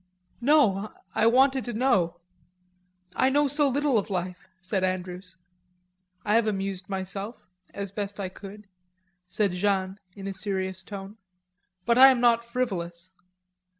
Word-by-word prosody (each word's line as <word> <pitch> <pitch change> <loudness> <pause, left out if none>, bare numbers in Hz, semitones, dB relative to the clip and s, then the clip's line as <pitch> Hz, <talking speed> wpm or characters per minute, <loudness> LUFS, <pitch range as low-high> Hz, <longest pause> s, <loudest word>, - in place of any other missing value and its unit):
"No. 215 -9 +4 0.2
I 225 - +3
wanted 265 +2 +4
to 240 - -4
know. 215 -8 +2 1.0
I 260 - +3
know 290 +2 +3
so 290 +1 +3
little 280 -3 +2
of 200 - -6
life," 180 -1 -4
said 190 0 -2
Andrews. 185 0 -4 0.9
"I 210 - +1
have 225 0 +3
amused 195 -2 -3
myself, 195 +3 -4 0.4
as 200 -1 -5
best 205 0 -5
I 195 - -2
could," 200 +3 -11 0.6
said 200 +1 0
Jeanne 190 +1 -1 0.2
in 195 - -9
a 195 - -3
serious 190 -1 -3
tone. 195 +1 -9 0.7
"But 235 +1 +3
I 265 - +11
am 260 -2 +4
not 235 -1 +4
frivolous.... 185 -8 -3
200 Hz, 140 wpm, -26 LUFS, 190-235 Hz, 1.0 s, I